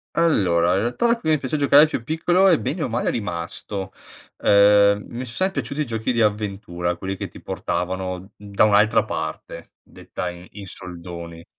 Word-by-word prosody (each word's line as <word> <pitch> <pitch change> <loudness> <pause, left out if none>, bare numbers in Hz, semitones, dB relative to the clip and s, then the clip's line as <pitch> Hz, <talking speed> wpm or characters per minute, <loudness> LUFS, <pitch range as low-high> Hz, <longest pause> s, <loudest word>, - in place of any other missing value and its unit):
Allora, 90 - +3
in 95 - +2
realtà 180 - +1
qui 160 - -4
mi 155 -1 +3
piace 135 +3 -3
giocare 145 +1 +6
più 140 -6 -4
piccolo 175 +7 +2
e, 170 - +5
bene 160 +1 -3
o - - -1
male, 115 +2 -1
è - - +1
rimasto, 95 0 -5 0.5
ehm, 100 0 +5
mi 120 +2 -6
son 115 - -8
sempre 190 +6 0
piaciuti 150 -5 -3
i - - -2
giochi 115 +1 -2
di 115 - +2
avventura, 100 -5 -2
quelli 95 +2 -4
che - - -6
ti - - -14
portavano 90 +2 -3
da 100 0 0
un'altra 105 +2 +4
parte, - - -6
detta 90 - -7
in 90 +1 -12
in 100 -1 -9
soldoni. 85 -2 -8
105 Hz, 180 wpm, -22 LUFS, 90-130 Hz, 0.5 s, giocare